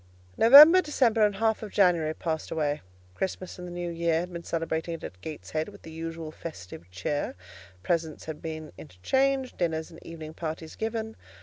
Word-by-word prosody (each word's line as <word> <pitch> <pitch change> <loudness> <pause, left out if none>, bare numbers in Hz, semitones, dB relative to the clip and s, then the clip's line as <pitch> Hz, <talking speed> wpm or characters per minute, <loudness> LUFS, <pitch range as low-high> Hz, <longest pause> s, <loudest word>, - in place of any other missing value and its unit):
November, 300 +10 +10
December, 245 -9 +2
and 205 -1 +3
half 220 +1 +1
of 215 -2 -7
January 170 -5 +3
passed 160 -2 -3
away. 150 -2 -1 0.3
Christmas 185 - -4
and 180 - -7
the - - -8
New 175 0 -4
Year 165 -1 +1
had 180 0 -7
been 170 0 -6
celebrated 165 0 -3
at 90 - -9
Gateshead 155 +1 -4
with 200 0 -15
the 160 - -10
usual 165 0 -6
festive 90 - -9
cheer; 95 +11 -3 0.5
presents 160 - -1
had 160 -1 -7
been 155 -1 -6
interchanged, 265 - -1
dinners 160 -2 -1
and 165 - -14
evening 160 -2 -8
parties 160 0 -6
given. 220 0 -3
165 Hz, 170 wpm, -27 LUFS, 160-205 Hz, 0.5 s, November